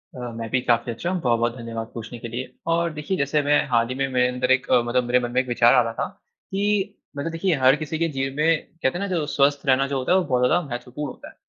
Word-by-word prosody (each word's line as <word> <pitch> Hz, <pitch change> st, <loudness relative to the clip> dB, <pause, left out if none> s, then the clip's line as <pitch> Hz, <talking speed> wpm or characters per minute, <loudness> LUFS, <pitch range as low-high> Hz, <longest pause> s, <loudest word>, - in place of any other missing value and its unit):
अ, -, -, -8 dB, 0.2 s
मैं 115 Hz, -1 st, -5 dB
भी 130 Hz, -, +1 dB
काफ़ी 120 Hz, -1 st, +1 dB
अच्छा 170 Hz, +10 st, -4 dB
हूँ, 185 Hz, -1 st, -1 dB
बहुत-बहुत 120 Hz, -1 st, +1 dB
धन्यवाद 115 Hz, -1 st, -5 dB
पूछने 115 Hz, +1 st, -7 dB
के 115 Hz, -, -6 dB
लिए। 125 Hz, +2 st, -5 dB, 0.2 s
और 170 Hz, 0 st, +1 dB
देखिये 150 Hz, +5 st, -3 dB
जैसे 140 Hz, +2 st, +1 dB
मैं 145 Hz, +1 st, +3 dB
हाल 115 Hz, -1 st, +3 dB
ही 130 Hz, -, -3 dB
मेरे 130 Hz, -2 st, +1 dB
अंदर 125 Hz, +1 st, -1 dB
एक 130 Hz, 0 st, +2 dB
मतलब 125 Hz, 0 st, +3 dB
मेरे 125 Hz, +1 st, +2 dB
मन 120 Hz, -1 st, -4 dB
में 125 Hz, +1 st, +3 dB
एक 130 Hz, -, -10 dB
विचार 120 Hz, -1 st, +4 dB
आ 125 Hz, -, +6 dB
रहा 115 Hz, -1 st, -3 dB
था, -, -, -2 dB, 0.4 s
कि 200 Hz, 0 st, 0 dB, 0.2 s
मतलब 155 Hz, +4 st, -3 dB
देखिये 165 Hz, +1 st, 0 dB
हर 130 Hz, 0 st, +5 dB
किसी 155 Hz, +1 st, -4 dB
के 165 Hz, -, +2 dB
जीवन 135 Hz, -2 st, -3 dB
में 160 Hz, +2 st, +3 dB, 0.3 s
कहते 130 Hz, +6 st, +1 dB
हैं -, -, -5 dB
ना 200 Hz, -, -2 dB
जो 155 Hz, -, 0 dB
स्वस्थ 140 Hz, 0 st, +1 dB
रहना 135 Hz, 0 st, +3 dB
जो 140 Hz, -1 st, -2 dB
होता 130 Hz, -, -1 dB
है, 185 Hz, -, +6 dB
वो 185 Hz, -, +2 dB
बहुत 125 Hz, -4 st, +1 dB
ज़्यादा 170 Hz, +7 st, +3 dB
महत्वपूर्ण 125 Hz, +3 st, -5 dB
होता -, -, -12 dB
है। -, -, -19 dB
130 Hz, 270 wpm, -23 LUFS, 120-150 Hz, 0.4 s, आ